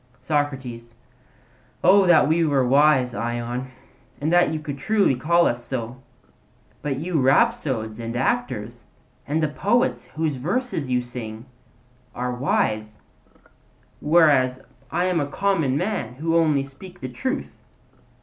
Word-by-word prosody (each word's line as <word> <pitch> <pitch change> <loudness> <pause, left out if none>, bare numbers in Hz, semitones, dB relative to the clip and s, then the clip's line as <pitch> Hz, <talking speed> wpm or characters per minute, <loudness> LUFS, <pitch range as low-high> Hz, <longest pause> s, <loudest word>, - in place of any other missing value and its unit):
SOCRATES: 130 -5 -3 0.9
O 195 -1 +6
that 165 -4 +6
we 165 +2 +2
were 140 -5 +2
wise, 135 -2 +4
Ion, 120 +4 -3 0.5
and 155 +4 -1
that 175 -2 +4
you 160 - -2
could 145 -3 -6
truly 205 -1 +2
call 170 +7 +2
us 120 0 -1
so; 125 0 -5 0.8
but 140 -3 -2
you 160 0 -1
rhapsodes 125 -4 +1
and 115 0 -5
actors, 120 - -2 0.4
and 155 +3 0
the - - +3
poets 205 +11 0
whose 155 -3 -3
verses 175 - -2
you 125 -1 +1
sing, 115 -2 -8 0.7
are 125 0 -2
wise; 110 -4 -1 1.0
whereas 145 -5 +4 0.3
I 175 - 0
am 180 -2 +1
a 145 - -1
common 160 -5 0
man, 180 - -2
who 165 +4 -1
only 155 -4 +3
speak 180 +7 -13
the 130 - -5
truth. 260 - -4
140 Hz, 130 wpm, -23 LUFS, 125-165 Hz, 1.0 s, O